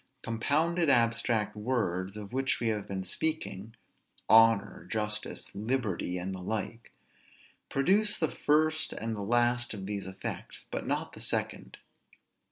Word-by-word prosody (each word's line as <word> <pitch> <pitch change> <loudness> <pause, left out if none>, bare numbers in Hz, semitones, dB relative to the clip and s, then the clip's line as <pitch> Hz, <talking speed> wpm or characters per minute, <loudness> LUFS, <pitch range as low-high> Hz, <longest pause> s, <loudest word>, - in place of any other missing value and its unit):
Compounded 155 +8 +1
abstract 115 -3 +2
words, 105 -4 -1
of 105 +2 -8
which 135 0 +1
we 115 - 0
have 105 -2 -2
been 95 -1 -3
speaking, 110 - -2 0.5
(honor, 115 -2 +5
justice, 105 -1 -2
liberty, 105 -4 -1
and 90 +2 -4
the 95 - -6
like,) 110 +4 -4 0.8
produce 200 +10 +3
the 160 - 0
first 155 +1 +2
and 115 +1 -3
the 105 - -5
last 120 +2 +2
of 95 -2 -6
these 100 -1 -4
effects, 95 0 -6
but - - -3
not - - -2
the - - -10
second. - - -1
115 Hz, 135 wpm, -30 LUFS, 100-130 Hz, 0.8 s, honor